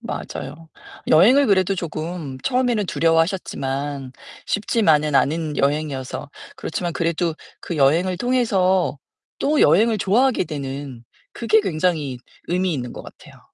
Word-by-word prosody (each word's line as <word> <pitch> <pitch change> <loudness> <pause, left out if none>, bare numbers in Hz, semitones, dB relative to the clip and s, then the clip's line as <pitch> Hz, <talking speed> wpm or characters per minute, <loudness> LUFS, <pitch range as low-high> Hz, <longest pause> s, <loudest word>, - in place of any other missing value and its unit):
맞아요. 155 +4 -7 0.4
여행을 250 - +6
그래도 195 -1 +2
조금 160 -4 -5
처음에는 250 -5 +1
두려워하셨지만 145 -6 -1 0.3
쉽지만은 160 -9 +1
않은 155 +2 +1
여행이어서 140 -1 -2 0.3
그렇지만 175 +1 -4
그래도 170 0 -1 0.3
그 170 - -5
여행을 170 +7 +2
통해서 190 - +1 0.4
또 295 +1 +1
여행을 215 +9 +4
좋아하게 225 +3 +2
되는 140 -4 -6 0.3
그게 220 -2 +2
굉장히 155 -7 -1 0.3
의미 180 -1 0
있는 125 -3 -5
것 - - -9
같아요. - - -15
165 Hz, 310 characters per minute, -21 LUFS, 145-195 Hz, 0.4 s, 여행을